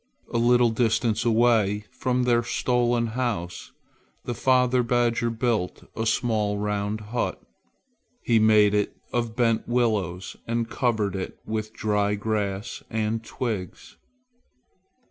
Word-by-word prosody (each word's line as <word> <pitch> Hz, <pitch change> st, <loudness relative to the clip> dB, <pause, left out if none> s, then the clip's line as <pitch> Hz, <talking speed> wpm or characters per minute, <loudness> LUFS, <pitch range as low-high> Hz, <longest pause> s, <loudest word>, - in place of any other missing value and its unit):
A 115 Hz, -, +2 dB
little 120 Hz, 0 st, +4 dB
distance 115 Hz, 0 st, +1 dB
away 110 Hz, -3 st, +3 dB
from 125 Hz, 0 st, 0 dB
their 120 Hz, -1 st, +3 dB
stolen 120 Hz, 0 st, +1 dB
house 110 Hz, -7 st, -3 dB, 0.5 s
the 120 Hz, -, -2 dB
father 125 Hz, +1 st, +3 dB
badger 120 Hz, -1 st, +1 dB
built 115 Hz, -5 st, -1 dB
a 110 Hz, 0 st, -1 dB
small 110 Hz, -3 st, +1 dB
round 105 Hz, +1 st, -2 dB
hut. 120 Hz, -, -1 dB, 0.8 s
He 115 Hz, -2 st, +3 dB
made 105 Hz, -1 st, +5 dB
it 105 Hz, -1 st, 0 dB, 0.2 s
of 120 Hz, -2 st, -1 dB
bent 115 Hz, -2 st, +1 dB
willows 105 Hz, -7 st, 0 dB
and 115 Hz, 0 st, -1 dB
covered 110 Hz, -6 st, 0 dB
it 95 Hz, -, -5 dB
with 110 Hz, 0 st, -3 dB
dry 105 Hz, -2 st, 0 dB
grass 105 Hz, 0 st, -3 dB
and 110 Hz, 0 st, -1 dB
twigs. 110 Hz, -6 st, -5 dB
115 Hz, 120 wpm, -25 LUFS, 105-120 Hz, 0.8 s, made